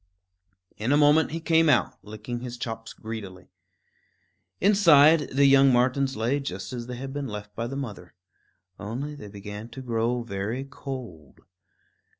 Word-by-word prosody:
In 110 +5 -1
a 145 - +5
moment 150 +1 +5
he 165 - -4
came 165 -1 +3
out, 130 - +2
licking 110 +3 -6
his 125 0 -7
chops 115 -1 -6
greedily. 100 -5 -8 1.1
Inside, 165 -7 +5
the 140 +2 +3
young 135 0 +6
martens 130 +1 +1
lay 120 +6 0
just 95 -6 -6
as 120 -1 -5
they 125 - -5
had 135 +1 -6
been 145 -1 -3
left 105 -1 -7
by 115 +1 -3
the 135 - -6
mother; 105 -10 -7 0.6
only 125 +8 -5
they 140 -8 -10
began 105 +2 -8
to 130 +3 -9
grow 120 0 -1
very 110 +4 -4
cold. 130 - -9
125 Hz, 150 wpm, -26 LUFS, 110-140 Hz, 1.1 s, young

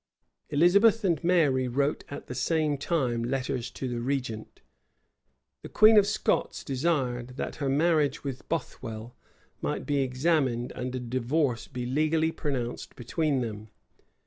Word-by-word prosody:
Elizabeth 200 +9 +4
and 170 -7 +1
Mary 150 -8 +3
wrote 140 +4 0
at 140 - -7
the - - -6
same 150 +4 +1
time 135 -6 -1
letters 130 -1 -2
to 130 - -5
the 120 -1 -3
regent. 125 -4 -3 1.0
The - - -9
queen 215 +1 +6
of 205 -2 +6
Scots 210 - 0
desired, 130 -4 -1
that - - -4
her 140 -2 -1
marriage 150 -1 +2
with 135 -3 -6
Bothwell 120 -7 -5 0.5
might - - -2
be 145 -1 +1
examined, 130 -2 +1
and 125 +1 -4
a - - -2
divorce 125 +1 -1
be 125 -1 -5
legally 155 +5 +1
pronounced 130 -7 -4
between 140 +2 -1
them. 110 -2 -5
135 Hz, 140 wpm, -28 LUFS, 125-160 Hz, 1.0 s, queen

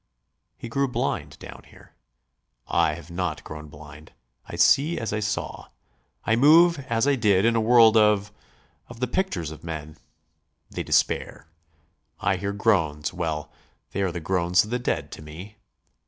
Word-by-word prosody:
He - - -8
grew 140 +4 0
blind 125 - -3
down - - -11
here. - - -19 0.7
I 75 - +1
have 85 +1 -12
not 85 -3 -3
grown 75 0 -9
blind. 75 +1 -14 0.3
I - - -7
see 150 +5 +3
as 110 -2 -3
I 105 - -1
saw. 105 +1 -4 0.6
I 110 - +2
move 160 +6 +6
as 115 +3 +1
I 145 - +4
did 105 -6 +2
in 115 0 +3
a 115 - +2
world 115 -1 +6
of... 105 -1 +3 0.6
of 120 -1 -12
the 125 - +1
pictures 115 - -2
of 80 - -11
men. 80 -2 -7 0.7
They - - -4
despair. - - 0 0.7
I 95 0 0
hear 100 +2 -3
groans... 85 -8 0
well, 80 -4 -4 0.4
they 100 - -3
are 95 -2 0
the 85 - -5
groans 90 +1 +2
of 105 - -9
the 125 - -1
dead 120 - -2
to - - -9
me. 90 +8 -11
100 Hz, 165 wpm, -24 LUFS, 80-115 Hz, 0.7 s, move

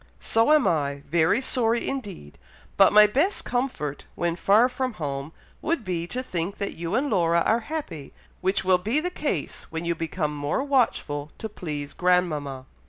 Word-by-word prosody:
"So 225 +5 +2
am 305 -3 +5
I, 140 -3 0
very 165 - +3
sorry 235 -3 +1
indeed; 200 - -6 0.4
but 195 - +6
my 210 0 +8
best 285 - +1
comfort, 245 - -3
when 170 -1 -1
far 210 +7 +4
from 255 -1 -3
home, 140 -4 -4 0.3
would 320 -6 -1
be, 175 -3 -3
to 250 +7 -4
think 180 -3 -3
that 200 - -3
you 170 +4 -3
and 270 +4 +1
Laura 170 -7 +2
are 225 +7 +2
happy, 235 - -6 0.3
which 190 +1 +1
will 185 -1 +4
be 220 +11 0
the 360 +3 -3
case 285 - -3
when 165 +1 -4
you 170 - +1
become 160 -2 -3
more 145 - -1
watchful 195 - 0
to 220 - -4
please 150 -8 -6
grandmama." 155 -7 0
180 Hz, 170 wpm, -25 LUFS, 155-245 Hz, 0.4 s, my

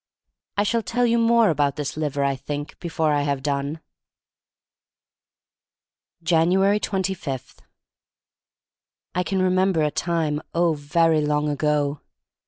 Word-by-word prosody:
I 205 - +3
shall 230 +3 +1
tell 235 +5 0
you 235 0 +2
more 230 -3 +4
about 145 -2 +1
this 145 -2 -4
liver, 145 -2 -1
I 140 0 +1
think, 145 +2 -6
before 160 -3 0
I 145 - +2
have 140 -2 -1
done. 140 +2 -2 2.4
5anuats 185 +5 +3
25. 185 - -3 1.6
I 180 - 0
CAN 190 +1 0
remember 185 -2 +2
a 150 - +1
time 165 -3 -1
long, - - -6
oh, 170 -1 +3
very 155 +2 +2
long 150 0 0
ago. 145 0 0
160 Hz, 125 wpm, -23 LUFS, 145-185 Hz, 2.4 s, more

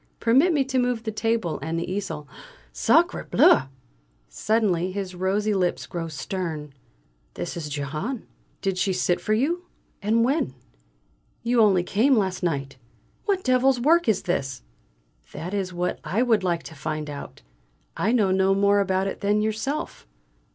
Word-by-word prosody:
Permit 265 +10 +4
me 295 -4 +2
to 260 -1 0
move 245 -2 0
the 220 - -3
table 225 -5 -1
and 160 +1 -3
the 170 - -4
easel 175 -6 -4 0.5
Sacré - - +2
bleu!" 135 - +5 0.6
Suddenly 185 - 0
his 190 -1 -4
rosy 195 +4 0
lips 180 -3 0
grow 170 -3 -4
stern. 160 -3 -5 0.6
"This 90 - -4
is 160 -3 -5
Jehane. 150 - -4 0.4
Did 190 -2 0
she 195 -1 +1
sit 180 -1 +1
for 215 - 0
you 340 +10 -1 0.3
and 225 +3 +2
when? 260 - 0 0.9
You 235 0 +3
only 195 -5 +4
came 230 +9 +3
last 190 -3 0
night. 140 -6 -2 0.5
What 390 -2 0
devil's 255 0 +3
work 325 +3 +4
is 210 - +1
this?" 135 - -2 0.7
"That 180 +4 -6
is 195 -2 -2
what 180 0 -2
I 195 +10 +1
would 225 -6 +2
like 170 -2 0
to - - -10
find 155 0 -4
out; 145 - -8 0.5
I 215 - +1
know 210 -6 +3
no 190 +1 +3
more 200 +1 +4
about 190 -1 +1
it 195 - -4
than 205 +1 +2
you 215 +1 +1
yourself. 270 - -4
195 Hz, 160 wpm, -25 LUFS, 170-230 Hz, 0.9 s, bleu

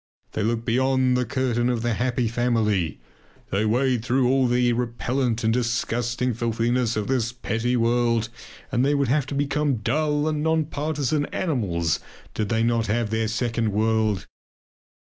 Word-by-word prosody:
They - - -3
look 115 +2 -1
behind 130 +1 +2
the 125 0 +1
curtain 125 -1 0
of 120 -2 -1
the 120 -1 +1
"happy 125 +1 0
family"; 110 - 0 0.5
they 100 +3 +1
wade 125 +1 +1
through 125 +1 +2
all 130 0 +3
the 120 0 +2
repellant 120 0 -1
and 110 0 +2
disgusting 120 0 -1
filthiness 115 +1 0
of 105 -1 -1
this 120 -2 0
petty 120 0 -1
world, 115 -1 +1 0.4
and 125 -1 +2
they 145 +2 +2
would 140 -3 +1
have 140 0 +1
to 140 - -4
become 145 0 +1
dull 150 +7 0
and 155 -1 -1
non 160 0 +1
partisan 150 0 -1
animals 95 - -1 0.3
did 105 -2 -2
they 115 -1 +1
not 115 -1 +1
have 110 0 0
their 110 0 0
second 115 -1 -1
world. 110 -3 +1
120 Hz, 160 wpm, -24 LUFS, 115-130 Hz, 0.5 s, all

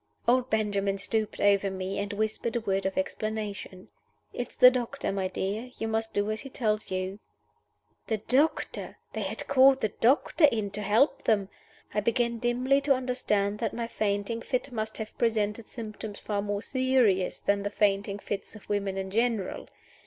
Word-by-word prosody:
Old 250 +1 +3
Benjamin 200 -2 0
stooped 215 +2 -1
over 200 -1 +4
me, 190 +1 -3
and 200 +1 -2
whispered 220 +3 -2
a - - +2
word 195 -2 0
of 190 - -4
explanation. 205 -2 -4 0.4
"It's 245 - -5
the 250 - +9
doctor, 255 +2 -2
my 195 -1 -1
dear. 200 +6 -3
You 225 - -2
must 225 0 -1
do 205 +1 0
as 215 - -2
he 270 - -8
tells 215 -4 -1
you." 185 +2 -3 0.9
The 220 - 0
doctor! 260 +9 0 0.2
They - - -3
had - - -4
called 265 0 +6
the 215 - 0
doctor 270 - +3
in 215 -7 +1
to 205 +1 -4
help 250 +7 +2
them! 200 -3 +2 0.4
I - - +2
began 235 +2 +1
dimly 250 +3 +2
to 275 -1 +3
understand 210 -5 0
that - - -2
my 235 0 -2
fainting 210 +1 -1
fit 255 +2 -2
must 220 -2 -3
have 220 -1 -6
presented 220 -1 0
symptoms 215 -2 -7
far 205 -1 -2
more 205 0 -2
serious 255 -8 +2
than 200 0 +1
the 205 - -2
fainting 200 -1 +1
fits 205 +1 -5
of 215 - -13
women 200 -2 -1
in 190 0 -4
general. 225 -2 0
215 Hz, 175 wpm, -28 LUFS, 200-240 Hz, 0.9 s, the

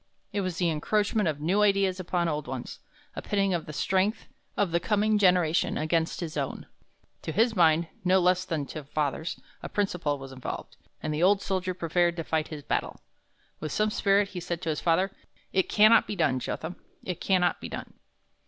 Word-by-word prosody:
It 200 - 0
was 185 -3 -3
the 180 - +1
encroachment 205 +5 +1
of 150 -2 -3
new 180 +7 +1
ideas 195 -2 +3
upon 175 -1 0
old 150 -3 -2
ones 130 -1 -6 0.4
a - - -4
pitting 195 -2 +1
of 170 -2 -2
the - - -5
strength 190 +7 0 0.3
of 200 -4 +1
the 170 - +2
coming 210 +2 +2
generation 180 -4 +3
against 160 +2 0
his 160 -2 -5
own. 140 -3 -3 0.6
To - - -4
his 225 +6 +2
mind, 165 -2 +4 0.2
no 185 +1 +4
less 180 0 +3
than 160 -6 -2
to 155 +2 -7
father's, 150 +3 -2 0.2
a - - -6
principle 180 -8 -1
was 135 -1 -9
involved, 130 -1 -6 0.3
and 155 - -1
the 150 - -2
old 195 +2 +4
soldier 185 -1 -1
prepared 175 0 +1
to 165 - -2
fight 160 -1 -1
his 150 -3 -8
battle. - - -2 0.6
With 155 - -4
some 215 0 +1
spirit 200 -1 +2
he 185 - -6
said 170 0 -4
to 160 -2 0
father, 175 +5 +1 0.4
'It 190 -1 +2
cannot 215 +2 +6
be 205 - -3
done, 130 -8 +1
Jotham; 160 +7 -5 0.3
it 180 -3 -5
cannot 180 -2 +2
be - - -6
done.' - - -7
175 Hz, 190 wpm, -28 LUFS, 155-195 Hz, 0.6 s, cannot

